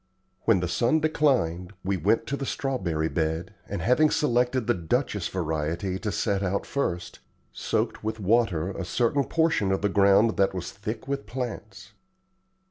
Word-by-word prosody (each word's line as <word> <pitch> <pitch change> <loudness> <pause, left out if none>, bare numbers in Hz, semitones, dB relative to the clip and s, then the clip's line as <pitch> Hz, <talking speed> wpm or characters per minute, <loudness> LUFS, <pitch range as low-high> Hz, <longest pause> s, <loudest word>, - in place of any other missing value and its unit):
When 105 -6 +4
the 90 - -1
sun 120 - +2
declined, 125 - +1
we 100 +1 0
went 115 +5 +1
to 140 - -2
the 135 -1 -4
strawberry 90 - -1
bed, 80 +3 -2 0.2
and 100 - -3
having 150 +6 +4
selected 125 -5 +1
the - - +3
Duchess 105 - -1
variety 85 +2 -2
to 105 0 -2
set 100 0 0
out 100 +1 -1
first, 90 -11 -3 0.3
soaked - - -2
with 110 +1 -3
water 100 -4 +1
a 95 - -5
certain 120 +9 +1
portion 160 -12 +1
of 95 - -1
the 105 - +3
ground 100 +3 +4
that 95 -1 +2
was 90 -2 -4
thick 110 +5 -6
with 140 0 -3
plants. 110 -5 -6
100 Hz, 160 wpm, -26 LUFS, 90-125 Hz, 0.3 s, When